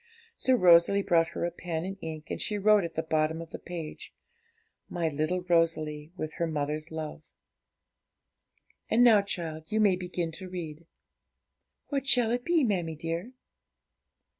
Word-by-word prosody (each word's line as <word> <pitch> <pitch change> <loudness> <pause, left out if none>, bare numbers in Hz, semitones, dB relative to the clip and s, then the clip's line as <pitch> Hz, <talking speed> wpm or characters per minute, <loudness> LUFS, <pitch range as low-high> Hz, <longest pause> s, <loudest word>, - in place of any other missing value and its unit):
So 260 - +3
Rosalie 180 0 +5
brought 165 -3 +3
her - - -1
a 175 - -2
pen 170 -1 -4
and 195 +1 -4
ink, 155 -1 -7
and - - -3
she 210 - -1
wrote 210 0 +4
at 170 - -5
the 160 - -1
bottom 160 0 0
of 165 -1 -9
the - - -7
page 165 -3 -8 0.8
'My 170 -2 -1
little 155 +5 -1
Rosalie, 165 -3 0
with 155 -2 -4
her 170 - 0
mother's 150 0 -3
love.' 160 -1 -6 1.7
'And 235 +2 +4
now, 225 -4 +7
child, 160 -5 -5
you 215 - +1
may 205 -4 +4
begin 180 -2 -3
to 185 +3 -8
read.' 165 -3 -7 1.0
'What 275 -2 -2
shall 245 -3 +4
it 245 +1 -1
be, 340 -1 +2
mammie 175 -8 0
dear?' 165 - -4
170 Hz, 160 wpm, -29 LUFS, 160-200 Hz, 1.7 s, now